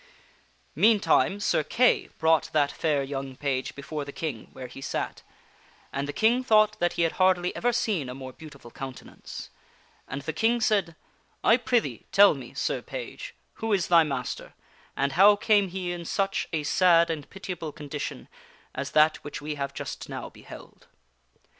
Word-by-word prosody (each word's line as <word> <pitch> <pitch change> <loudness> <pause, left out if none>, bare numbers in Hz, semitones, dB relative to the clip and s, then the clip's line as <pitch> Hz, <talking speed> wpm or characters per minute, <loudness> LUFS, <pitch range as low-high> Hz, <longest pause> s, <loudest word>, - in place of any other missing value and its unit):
Meantime, 205 -2 +3
Sir 205 - +1
Kay 250 +10 +2
brought 160 -2 +3
that 145 -2 +3
fair 150 -4 0
young 135 -1 -5
page 135 -1 -2
before 150 +1 -5
the 140 - -8
King; 155 - -5
where 130 - -8
he 125 +2 -10
sat, - - -3 0.7
and 140 +1 -2
the - - -2
King 230 - +2
thought 215 -3 +4
that 175 0 +1
he 170 - +1
had 165 - +2
hardly 185 -1 +2
ever 245 - +1
seen 205 - -1
a 125 - -6
more 130 -1 -8
beautiful 140 -6 -13
countenance. 130 +1 -9 0.6
And 135 +1 -5
the 160 - -3
King 225 +9 +2
said, 200 -7 +1 0.2
" - - -39
I 225 - +6
prithee 230 - -1
tell 200 0 +7
me, 130 -4 -10
Sir - - -1
Page, - - -7 0.3
who 225 -1 0
is 190 -4 +1
thy 170 -1 +7
master, 135 -5 -4 0.4
and 140 +1 +1
how 200 +7 +7
came 205 -1 +3
he 180 -1 -4
in 175 -1 -5
such 195 +2 -1
a 160 -3 -1
sad 170 +1 +4
and 150 -3 -5
pitiable 180 -5 -6
condition 145 0 -6 0.5
as 140 +1 -5
that 155 +1 +5
which 145 - -7
we 150 +1 -4
have 140 -1 -3
just - - -7
now - - -6
beheld." - - -13
160 Hz, 170 wpm, -27 LUFS, 140-200 Hz, 0.7 s, tell